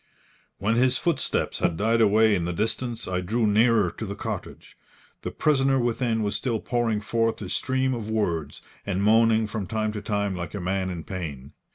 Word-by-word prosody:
When 110 +4 0
his 130 +1 +3
footsteps 170 -3 -1
had 80 - +1
died 115 +4 +2
away 110 0 +5
in 90 -4 0
the 90 - -2
distance, 115 +4 -2
I 90 0 -1
drew 110 +6 0
nearer 110 +1 +3
to 110 - -6
the 100 - -5
cottage. - - -6 0.5
The - - -3
prisoner 135 -3 +2
within 120 -2 0
was 100 -1 -1
still 115 +1 -1
pouring 115 -3 0
forth 115 +1 0
a 95 - -6
stream 130 +3 0
of 110 -3 -5
words, 85 -9 -2 0.2
and 95 +2 -1
moaning 110 +1 +4
from 105 -2 -4
time 110 +3 -1
to 105 -1 -5
time 100 -2 -1
like 85 +1 -5
a - - -3
man 95 +1 -1
in 85 -3 -5
pain. 75 -8 -6
110 Hz, 190 wpm, -25 LUFS, 95-115 Hz, 0.5 s, away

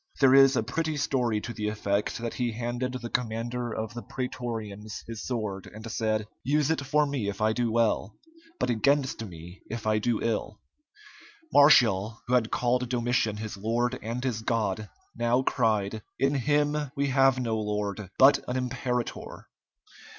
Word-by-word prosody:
There 135 -2 +6
is 135 0 +7
a 115 - +1
pretty 155 +6 -2
story 125 -6 +1
to 115 - -6
the 105 -2 -3
effect 105 -1 -1
that 115 0 -4
he 120 -2 -1
handed 120 +2 -3
the 120 -2 -5
commander 120 +1 -2
of 110 0 -4
the 120 - -6
prætorians 115 -5 -5
his 115 -1 -7
sword, 105 -6 -3
and 110 +1 -8
said, 110 -1 0 0.2
"Use 145 +3 +2
it 160 -3 0
for 150 +2 +2
me 135 -8 -2
if 100 - -6
I 110 0 +2
do 120 0 0
well, 110 -3 +1 0.4
but - - +1
against 135 +1 +1
me 90 -2 -10
if 115 -1 -5
I 110 0 +2
do 115 +1 0
ill." 110 -2 -2 0.9
Martial, 115 -7 +5
who 125 - -2
had 120 -3 +3
called 125 0 0
Domitian 120 -3 0
his 110 -1 -6
lord 120 +4 0
and 115 +3 -4
his 120 -5 -1
god, 110 -2 -1 0.3
now 120 +2 +2
cried, 110 -4 0 0.2
"In 135 +1 +2
him 145 +2 +2 0.2
we 140 0 0
have 135 0 +4
no 115 -3 -1
lord, 105 -2 -3
but 135 +2 +7
an 125 - -1
imperator!" 125 -1 -3
115 Hz, 165 wpm, -28 LUFS, 110-130 Hz, 0.9 s, is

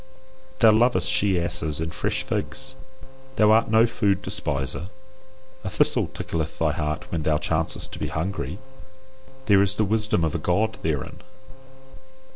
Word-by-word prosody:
Thou 115 -3 +6
lovest 120 +4 +3
she 100 -9 +2
asses 80 -3 +2
and 80 +1 -4
fresh 105 +5 -1
figs, 130 +2 -3 0.6
thou 105 -3 +4
art 110 +1 +4
no 110 +1 +5
food 100 -4 0
despiser. 70 +5 -3 0.7
A 95 - -3
thistle - - +1
tickleth 80 -2 -4
thy - - +1
heart 75 -1 -4
when 85 - -2
thou 75 0 +1
chancest 80 +1 -1
to - - -8
be - - -2
hungry. 80 -2 -4 0.9
There 100 -4 +5
is 100 +1 +2
the 110 - +1
wisdom 105 -4 +1
of 80 - 0
a 85 - -2
God 105 +7 0
therein. 75 -4 -3
95 Hz, 150 wpm, -24 LUFS, 80-110 Hz, 0.9 s, Thou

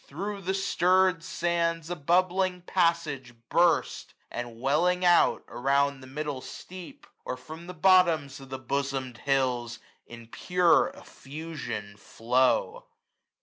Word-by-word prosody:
Thro' 200 0 -5
the 190 +1 -2
stirr'd 185 -2 +2
sands 170 -1 -1
a - - -1
bubbling 180 +3 +1
passage 165 -9 0
burst; 170 -1 +1 0.2
And 120 -1 -6
welling 180 +8 +1
out, 175 -1 +4
around 140 +2 0
the 130 - -12
middle 145 0 -4
steep. 185 - -10 0.2
Or 125 - -4
from 160 +7 -11
the 180 - -8
bottoms 165 -6 +3
of 135 -1 -13
the 130 - -5
bosom'd 130 -2 -3
hills, 125 -4 0 0.3
825 120 - -10
In 115 -1 -14
pure 180 +5 +3
effusion 135 -9 -8
flow. 285 - 0
160 Hz, 125 wpm, -27 LUFS, 130-180 Hz, 0.3 s, out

